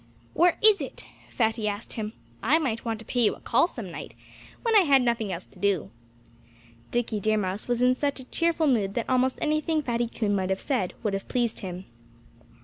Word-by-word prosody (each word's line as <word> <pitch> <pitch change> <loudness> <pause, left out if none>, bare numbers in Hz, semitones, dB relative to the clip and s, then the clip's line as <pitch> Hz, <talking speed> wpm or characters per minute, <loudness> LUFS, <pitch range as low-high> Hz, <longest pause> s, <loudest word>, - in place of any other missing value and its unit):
"Where 345 0 +4
is 430 -2 +7
it!" - - -6 0.2
Fatty 225 -2 0
asked 205 +2 -4
him. 215 -1 -4 0.3
"I 280 +8 +4
might 255 -8 -2
want 225 -2 -2
to 225 - -12
pay 245 - -1
you 220 - +3
a - - -17
call 250 +8 +3
some 225 - -7
night - - -8 0.5
when 460 -2 +2
I - - +9
had 275 -7 +4
nothing 235 -4 0
else 180 0 -5
to - - -20
do." 190 - 0 1.0
Dickie 240 -3 -1
Deer 215 +2 +2
Mouse 195 0 -2
was 245 0 +1
in 250 0 +5
such 280 +2 -1
a - - -7
cheerful 335 +2 +1
mood 210 -8 +1
that 235 - -1
almost 255 0 +2
anything 305 0 +1
Fatty 240 -2 0
Coon 215 -3 -1
might 190 -1 -1
have 190 0 0
said 230 -11 -1
would 210 -3 0
have 195 - -3
pleased 240 -3 -1
him. 185 -1 -6
235 Hz, 210 wpm, -26 LUFS, 205-270 Hz, 1.0 s, I